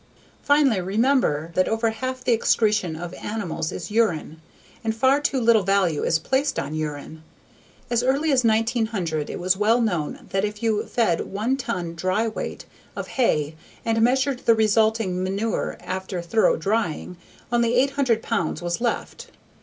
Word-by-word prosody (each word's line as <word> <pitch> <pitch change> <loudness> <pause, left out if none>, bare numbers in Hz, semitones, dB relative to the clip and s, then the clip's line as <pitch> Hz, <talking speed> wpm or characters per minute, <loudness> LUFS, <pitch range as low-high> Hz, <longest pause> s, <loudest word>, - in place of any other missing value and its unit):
Finally, 285 -9 +3
remember 195 - +1
that 185 +1 +2
over 225 0 +1
half 255 +3 -4
the - - +1
excretion 215 -6 +1
of 175 +2 -6
animals 200 -8 -4
is 175 +2 -6
urine. 170 -8 0 0.4
And 220 -1 -1
far 265 +5 +3
too 275 -2 0
little 230 -2 +4
value 195 -5 +1
is 165 - +2
placed 265 - 0
on - - -3
urine. 155 0 -5 0.7
As 240 -1 +2
early 275 +5 +1
as 260 -2 +3
1900 220 -8 0
it - - -5
was 185 +1 +2
well 215 +4 +3
known 175 -10 -2
that 195 0 0
if 210 +1 -4
you 220 -2 0
fed 215 -9 +1
one 215 +7 -1
ton 180 -10 -4
(dry 185 +6 0
weight) 220 - -5 0.3
of - - -5
hay 155 - +1 0.3
and 225 -1 +1
measured 260 +2 +2
the 230 - +6
resulting 220 -3 +2
manure 200 +4 -2
after 185 0 -4
thorough 195 +6 +2
drying, 195 -1 -2 0.4
only 235 0 +2
800 260 -3 +2
pounds 200 -8 -1
was 175 +3 -3
left. 240 -1 -3
220 Hz, 155 wpm, -23 LUFS, 180-235 Hz, 0.7 s, the